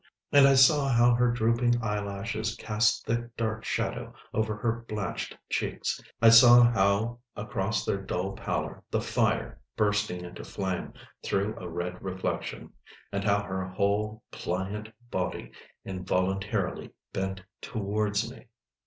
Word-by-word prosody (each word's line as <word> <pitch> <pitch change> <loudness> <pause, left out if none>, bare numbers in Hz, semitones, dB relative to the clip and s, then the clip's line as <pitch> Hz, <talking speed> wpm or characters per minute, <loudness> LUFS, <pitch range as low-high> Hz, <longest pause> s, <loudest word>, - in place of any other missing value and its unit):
And 140 -1 +8
I 135 - +5
saw 140 +2 +6
how 120 -1 +5
her 120 +1 +3
drooping 120 +1 +2
eyelashes 105 +1 -2
cast 110 -1 +1
thick 120 +1 -3
dark 110 -1 -2
shadow - - -3 0.2
over 110 -1 0
her 115 +2 -2
blanched 105 -4 -4
cheeks. - - -2 0.2
I 115 - +7
saw 120 +1 +9
how 115 +1 +2 0.2
across 105 0 -2
their 100 - -1
dull 95 0 -2
pallor 95 - -3
the - - 0
fire, - - 0 0.2
bursting 105 -4 0
into 90 - -9
flame, 95 -2 -4 0.3
threw 100 +2 -1
a 90 - -7
red 90 +2 -4
reflection, 95 -1 -4 0.4
and 100 -1 -2
how 100 0 +2
her 95 -1 -3
whole 100 +3 -1
pliant 100 +4 -3 0.2
body 90 -1 -3 0.3
involuntarily 95 +1 -1 0.2
bent 95 0 -3 0.2
towards 105 0 -1
me. 125 +1 -12
105 Hz, 130 wpm, -28 LUFS, 95-115 Hz, 0.4 s, saw